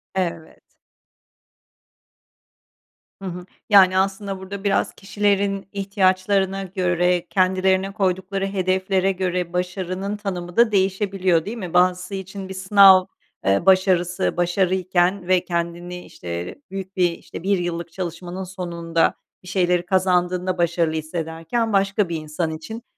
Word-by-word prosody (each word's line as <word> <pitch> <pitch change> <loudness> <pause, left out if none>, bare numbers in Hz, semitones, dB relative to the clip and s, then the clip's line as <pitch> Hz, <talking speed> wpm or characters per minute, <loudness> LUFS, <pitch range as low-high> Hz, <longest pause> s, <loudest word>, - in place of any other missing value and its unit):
Evet. 170 -4 -3 2.6
Hı 195 - -9
hı. 180 0 -7 0.2
Yani, 190 -3 +6
aslında 195 0 -1
burada 195 +1 -7
biraz 200 - +1
kişilerin 200 -1 0
ihtiyaçlarına 195 0 +1
göre, 180 -2 0
kendilerine 190 +1 +2
koydukları 195 -1 -1
hedeflere 190 0 +1
göre 180 -2 -2
başarının 185 +2 -3
tanımı 180 -4 -5
da 235 -1 +5
değişebiliyor, 190 -3 +1
değil 225 +4 -5
mi? 180 -6 -6
Bazısı 180 +2 +2
için 190 0 -7
bir - - -5
sınav, 190 0 +6 0.4
eee, 100 - +2
başarısı 185 -2 +2
başarıyken 180 +1 +1
ve 185 -1 +2
kendini, 175 +1 -4
işte, 85 0 -6 0.2
büyük 195 0 -6
bir 180 -2 +3
işte 170 - -10
1 200 +1 +2
yıllık 170 -1 -4
çalışmanın 175 +1 -5
sonunda 170 -3 -1 0.3
bir - - -14
şeyleri 180 -1 +1
kazandığında 180 0 +1
başarılı 170 -2 +1
hissederken 165 +7 -3
başka 195 -1 +2
bir 170 - -2
insan 155 +1 -3
için 165 +9 -7
185 Hz, 120 wpm, -22 LUFS, 175-195 Hz, 2.6 s, Yani